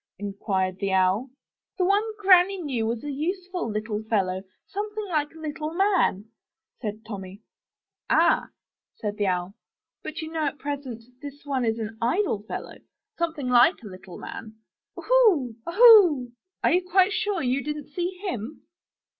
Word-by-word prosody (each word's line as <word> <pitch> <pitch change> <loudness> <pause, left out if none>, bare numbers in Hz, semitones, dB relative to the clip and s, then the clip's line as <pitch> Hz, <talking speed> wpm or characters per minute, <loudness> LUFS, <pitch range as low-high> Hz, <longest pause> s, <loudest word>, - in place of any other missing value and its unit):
*' - - -68
inquired 190 -2 -2
the 195 -1 -1
Owl. 190 +7 +2 0.5
*The 365 - +2
one 400 +2 +4 0.2
Granny 380 -1 +5
knew 255 -9 -2
was 230 0 -3
a 290 - -4
useful 360 +2 -3
little 215 0 -3
fellow, 195 -4 0 0.2
something 420 +1 -4
like 300 -3 0
a - - -12
little 310 +1 -5
man, 375 - +2 0.6
said 215 -1 -5
Tommy. 200 -1 -8 0.7
*'Ah! - - +3 0.5
said 210 -1 -4
the 205 - 0
Owl, 180 +1 -1 0.5
''but 315 +2 -6
you 315 - -7
know 320 -2 -1
at 290 - -4
present 275 -6 -5 0.2
this 285 0 -10
one 270 -3 -1
is 225 -1 0
an 220 0 -6
idle 245 - +1
fellow, - - -6 0.4
something 320 -6 -2
like 250 +5 +4
a 210 - -8
little 185 -1 -11
man. 220 -1 -8 0.4
Oohoo! 415 - +3
oohoo! 355 - +7 0.3
Are - - +4
you 360 - +4
quite 370 +2 +3
sure 415 -6 -1
you 255 +2 0
didn't 300 -1 -5
see 355 +3 -3
him? 245 - -5
280 Hz, 155 wpm, -25 LUFS, 215-360 Hz, 0.7 s, oohoo